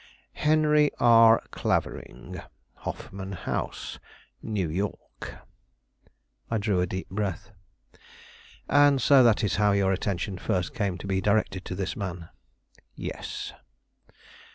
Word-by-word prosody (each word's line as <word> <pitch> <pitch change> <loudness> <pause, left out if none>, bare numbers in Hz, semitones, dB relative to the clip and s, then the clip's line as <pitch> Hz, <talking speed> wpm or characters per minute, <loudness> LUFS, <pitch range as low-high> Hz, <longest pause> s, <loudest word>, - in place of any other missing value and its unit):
"Henry 150 -1 +4
R. 115 -1 +6
Clavering, - - -3 0.4
Hoffman 95 0 -6
House, 90 - -4 0.4
New 100 -5 -2
York." 95 +6 -5 1.1
I 115 - 0
drew 100 -3 +1
a 90 - 0
deep 95 +2 -5
breath. 100 -3 -3 1.2
"And 145 -1 +5
so 135 +2 +6
that 115 -3 +4
is 100 - 0
how 105 -1 +3
your 100 -1 +2
attention 95 0 -2
first 90 0 -1
came 100 -4 -1
to 90 - -9
be 95 -1 0
directed 100 -2 +1
to 90 - -5
this 95 0 -3
man?" 90 -4 -5 0.7
"Yes." - - -6
100 Hz, 115 wpm, -27 LUFS, 95-115 Hz, 1.2 s, R